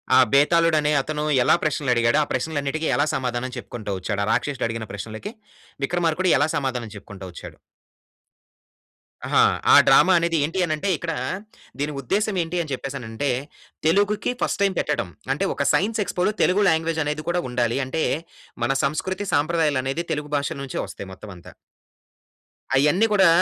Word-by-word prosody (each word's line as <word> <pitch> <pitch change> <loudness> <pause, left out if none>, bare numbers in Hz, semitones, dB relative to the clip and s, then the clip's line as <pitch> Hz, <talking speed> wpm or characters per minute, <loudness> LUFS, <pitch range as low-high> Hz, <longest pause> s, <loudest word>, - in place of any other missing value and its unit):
ఆ! - - +7
బేతాలుడు 165 +3 +4
అనే 150 0 +1
అతను 150 +1 -3 0.2
ఎలా - - +5
ప్రశ్నలు 145 -3 0
అడిగాడో 120 +4 +3
ఆ - - -4
ప్రశ్నలన్నిటికి 145 +3 -2
ఎలా 145 - +3
సమాధానం 125 0 -3
చెప్పుకుంటూ 110 -4 -6
వచ్చాడు? 100 +2 -2
ఆ - - -3
రాక్షసుడు 125 +3 0
అడిగిన 115 -1 -4
ప్రశ్నలకి 110 - -7 0.5
విక్రమార్కుడు 175 +2 0
ఎలా 145 - +3
సమాధానం 125 -5 -3
చెప్పుకుంటా 100 -1 -10
వచ్చాడు? 85 - -10 1.7
ఆహా! - - +4 0.3
ఆ - - +10
డ్రామా 190 - +6
అనేది 165 0 0
ఏంటి 165 +5 -3
అని 155 - -1
అంటే 175 +6 -2
ఇక్కడా 165 0 -3 0.6
దీని 150 +1 -1
ఉద్దేశ్యం 200 - 0
ఏంటి 165 +2 -4
అని 155 -4 -6
చెప్పేసి 135 +1 -4
అనంటే 115 +4 -3 0.6
తెలుగుకి 205 +6 +2
ఫస్ట్ - - -1
టైమ్ 195 -1 +2
పెట్టడం. 145 -11 -1 0.2
అంటే - - -1
ఒక - - -2
సైన్స్ 220 +3 +1
ఎక్స్పోలో 180 +3 0
తెలుగు 200 +3 +3
లాంగ్వేజ్ 160 0 0
అనేది 150 +1 -2
కూడా 175 +1 +1
ఉండాలి. 120 0 0
అంటే 155 +5 -2 0.6
మన 120 - +2
సంస్కృతి 185 +8 -2
సంప్రదాయాలు 150 -2 +1
అనేది 135 +6 -2
తెలుగు 150 -1 -5
భాష 140 0 -1
నుంచే 135 -2 -5
వస్తాయి 100 - -9
మొత్తం 100 +2 -11
అంతా. 85 - -14 1.2
అయన్నీ 150 +10 +4
కూడా 195 -3 +6
150 Hz, 160 wpm, -23 LUFS, 125-170 Hz, 1.7 s, ఆ